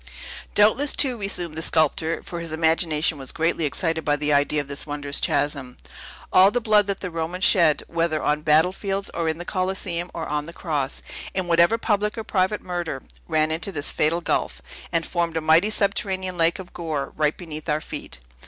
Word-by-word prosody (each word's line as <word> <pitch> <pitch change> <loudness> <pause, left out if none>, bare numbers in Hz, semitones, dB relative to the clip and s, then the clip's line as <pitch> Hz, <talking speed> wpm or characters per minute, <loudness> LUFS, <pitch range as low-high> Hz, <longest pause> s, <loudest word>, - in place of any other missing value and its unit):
"Doubtless, 225 +8 +4
too," 260 -3 +3
resumed 180 -6 -2
the 160 - -4
sculptor 160 +1 +1
(for 175 - -6
his 165 -1 -6
imagination 160 -1 +1
was 135 - -2
greatly 165 0 0
excited 160 +2 -1
by 145 - +2
the 150 0 0
idea 145 +1 +2
of 145 - -4
this 140 +2 -2
wondrous 145 -1 -2
chasm), 140 -3 -1 0.6
"all 185 +1 +7
the 245 - 0
blood 215 -3 +3
that 200 -1 -3
the 185 - -4
Romans 165 +3 -3
shed, 170 -7 +4
whether 165 -2 -1
on 150 +1 +1
battlefields, 185 +6 +1
or 165 -1 -1
in 160 - -2
the 175 - -7
Coliseum, 185 -2 -2
or 165 -1 -5
on 150 +1 -2
the 170 - -9
cross, 145 -7 -3 0.3
in 185 -1 0
whatever 170 +5 +4
public 210 -1 0
or 225 - -3
private 200 0 0
murder, 175 -7 -4 0.2
ran 155 -1 +1
into 170 +6 -1
this 145 -5 -2
fatal 165 +3 +1
gulf, - - -1 0.3
and 165 -1 0
formed 170 -2 -1
a - - +2
mighty 160 +6 +4
subterranean 190 -3 -1
lake 165 0 +2
of 185 -1 -10
gore, 155 -5 -4
right 150 0 +1
beneath 155 -3 -7
our 150 0 +1
feet. 110 - -7
165 Hz, 190 wpm, -23 LUFS, 155-185 Hz, 0.6 s, all